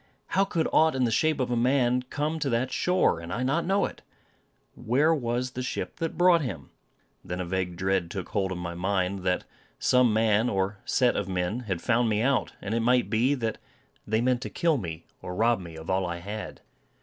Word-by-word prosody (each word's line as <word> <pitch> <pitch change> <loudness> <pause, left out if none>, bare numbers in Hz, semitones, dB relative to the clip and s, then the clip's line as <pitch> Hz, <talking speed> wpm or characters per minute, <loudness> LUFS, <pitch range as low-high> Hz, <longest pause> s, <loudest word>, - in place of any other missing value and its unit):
How 195 - +3
could 165 -4 0
aught 160 -2 +4
in 130 - +1
the 120 - +1
shape 155 +5 +2
of 125 -1 -1
a - - +2
man 125 0 +2
come 150 +5 -3
to 145 -3 -1
that 125 +2 0
shore, 180 - +2
and 85 +1 -8
I 120 +6 -2
not 160 +7 0
know 195 +1 +2
it? - - -8 0.7
Where 145 +8 +2
was 125 -3 -1
the 125 - -5
ship 125 - -4
that 165 -1 -3
brought 175 -1 +5
him? 95 - -5 0.5
Then 90 +1 -5
a 90 - -2
vague 90 0 -2
dread 95 -1 0
took 95 -1 -5
hold 95 -2 -1
of 95 - -3
my 85 -1 -4
mind, 95 +1 -1
that 90 -1 0 0.3
some 125 -2 +4
man, 110 +1 +3
or 100 +1 -1
set 125 -2 +2
of 100 -1 -2
men, 90 +5 -1
had 90 -4 -2
found 120 -1 +2
me 105 +1 +1
out; 135 0 +1
and 100 +2 -3
it 115 - +1
might 125 +2 +2
be, 120 +6 +3
that 115 -4 -3 0.5
they 110 +1 +1
meant 125 0 +1
to - - -4
kill 165 -4 +1
me, 85 -4 -6 0.2
or 90 - -6
rob 115 +2 +3
me 85 -3 -9
of 80 0 -9
all 95 -1 0
I 85 0 -3
had. 105 +5 -7
115 Hz, 220 wpm, -27 LUFS, 95-130 Hz, 0.7 s, brought